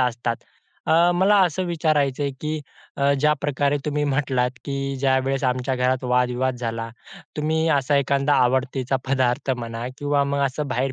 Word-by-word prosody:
असतात. 120 -1 0 0.5
अ, 170 +2 +4
मला 190 +4 +4
असं 180 +1 -1
विचारायचं 155 -5 0
आहे, 140 - 0
की 155 0 -2 0.4
अ, 140 0 +3
ज्या 150 +1 +4
प्रकारे 145 0 0
तुम्ही 150 0 -1
म्हटलात 130 -3 +1
की, 140 -1 -3 0.2
ज्यावेळेस 135 0 +1
आमच्या 130 +1 0
घरात 125 +1 0
वाद-विवाद 125 +1 +1
झाला, 115 -1 -4 0.5
तुम्ही 160 +1 0
असा 140 +2 +1
एखादा 140 +1 +2
आवडतीचा 130 +1 0
पदार्थ 130 0 +1
म्हणा 115 0 -5
किंवा 145 -1 +1
मग 140 0 -1
असं 140 +2 -4
बाहेर 130 +1 -1
135 Hz, 155 wpm, -23 LUFS, 125-145 Hz, 0.5 s, अ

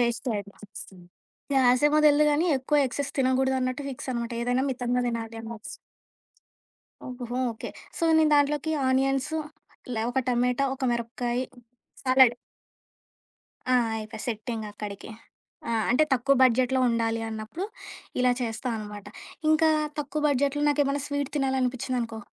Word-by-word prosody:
వేస్టే 235 +1 0
అనిపిస్తుంది. 200 -2 -11 0.5
గ్యాసేమో 265 +4 +4
తెలీదు 300 0 +5
గానీ, 300 +4 +2
ఎక్కువ 265 +3 0
ఎక్సైస్ 280 +2 -4
తినకూడదున్నట్టు 260 +1 +1
ఫిక్సనమాట. 245 -2 -4
ఏదైనా 245 +2 +1
మితంగా 250 -1 -1
తినాలి. 230 -1 -4
ఆనట్స్ 225 -1 -8 1.3
ఓహో! 245 -1 -5
ఓకే. 220 - -7 0.3
సో - - -7 0.2
నేను 310 -1 +4
దాంట్లోకి 290 +2 +2 0.2
ఆనియన్సు, 270 +3 +1 0.6
లా 220 - -1
ఒక 265 - +1
టమాటా, 250 +2 +2
ఒక 265 - -13
మిరపకాయ, 240 +1 -2 0.6
సలాడ్ 255 -2 +5 1.4
ఆ! - - +5 0.2
అయిపాయ్. 215 0 -7
సెట్టింగక్కడికి. 215 -3 -5 0.6
ఆ! - - -1 0.2
అంటే 255 +6 +4
తక్కువ 275 +2 +2
బడ్జెట్‌‌లో 255 +1 +3
ఉండాలి 230 -1 0
అన్నప్పుడు 220 - -5 0.6
ఇలా 250 0 +4
చేస్తానమాట. 220 -3 -4 0.4
ఇంకా 315 +1 +4 0.3
తక్కువ 295 +1 -2
బడ్జెట్‌లో 285 +1 +1
నాకేమైనా 285 -1 +1
స్వీట్ 285 -1 -2
తినాలనిపించిందనుకో. 255 -3 -1
250 Hz, 115 wpm, -26 LUFS, 230-275 Hz, 1.4 s, తెలీదు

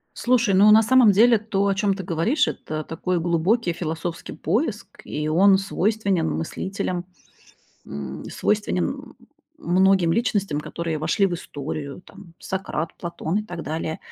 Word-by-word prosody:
Слушай, 235 -5 +2
ну, 205 +3 +7
на 220 +1 +7
самом 245 -1 +6
деле, 230 +4 +5
то, 200 -2 -1
о 195 - +2
чём 200 -1 +1
ты 190 -1 -6
говоришь, 175 - +1
это 155 0 -4
такой 175 +3 -2
глубокий 175 +4 +1
философский 165 0 -5
поиск 210 - -1 0.2
и 150 0 -3
он 190 +4 +5
свойственен 195 -3 0
мыслителям, 180 +1 -3 0.8
м, 70 0 -7
свойственен, 205 - 0
м, - - -8 0.4
многим 185 -1 +3
личностям, 200 -10 0
которые 165 0 -4
вошли 165 +6 +1
в 180 - -4
историю, 145 -1 -6
там: 195 -4 -15
Сократ, 175 -4 -3
Платон 170 +2 -3
и - - -2
так 175 -5 -7
далее. 160 0 -4
185 Hz, 145 wpm, -23 LUFS, 165-205 Hz, 0.8 s, ну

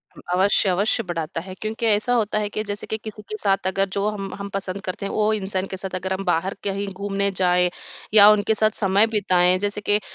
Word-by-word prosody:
उम, - - -13
अवश्य, 195 +2 +3
अवश्य 200 +5 +1
बढ़ाता 165 -2 -4
है 185 +2 -9
क्योंकि 220 +2 -3
ऐसा 215 +2 +2
होता 215 -3 +1
है 210 -1 -2
कि 215 - -3
जैसे 205 -1 -5
कि 220 - -2
किसी 215 -1 -7
के 215 - -4
साथ 195 -2 0
अगर 195 +1 +1
जो 200 +1 0
हम 200 -2 -5
हम 200 0 -5
पसंद 195 0 -4
करते 185 +1 -5
हैं, 200 - -3
वो 215 0 +2
इंसान 190 -2 -2
के 190 - -4
साथ 190 0 -5
अगर 190 +1 -2
हम 190 +1 -3
बाहर 180 +3 0
कहीं 200 0 -2
घूमने 200 +1 -1
जाएँ 180 -1 +3 0.4
या 210 -1 +9
उनके 210 +1 +2
साथ 215 0 +2
समय 200 +1 +3
बिताएँ, 185 -4 +3
जैसे 205 +1 -2
के 205 0 +2
अ, - - -8
200 Hz, 235 wpm, -23 LUFS, 190-210 Hz, 0.4 s, या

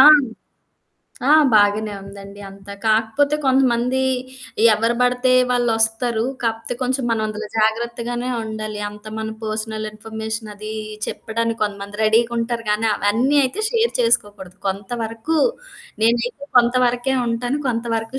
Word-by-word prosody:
ఆ! - - +11 1.3
ఆ! - - +6 0.2
బాగానే 210 0 +3
ఉందండి 200 0 -11
అంతా. 195 +1 -11
కాకపోతే 225 +7 +2
కొంతమంది 260 -1 +2 0.7
ఎవరు 230 +3 +1
పడితే 250 +1 +2 0.2
వాళ్ళొస్తారు. 225 -1 +1 0.2
కాకపోతే 230 +1 -2
కొంచెం 255 +1 -1
మనం 225 -1 +1
అందులో 215 0 -5
జాగ్రత్తగానే 235 +2 -1 0.2
ఉండాలి. 215 -1 -5
అంత 210 0 -13
మన 220 0 -3
పర్సనల్ 215 0 -3
ఇన్ఫర్మేషన్ 220 0 -6
అది 215 +1 -7 0.3
చెప్పడానికి 230 +1 -3
కొంతమంది 200 0 -4
రెడీగుంటారు 230 +1 +1
గానీ 215 +2 +1
అవన్నీ 235 +9 +1
అయితే 380 +12 -3
షేర్ 465 -1 +1
చేసుకోకూడదు. 205 -5 0
కొంతవరకు 225 +8 -3 0.7
నేనైతే 240 +4 +1
కొంతవరకే 245 +1 +2
ఉంటాను. 245 +4 -1
కొంతవరకు 230 +1 -2
225 Hz, 110 wpm, -21 LUFS, 215-245 Hz, 1.3 s, ఆ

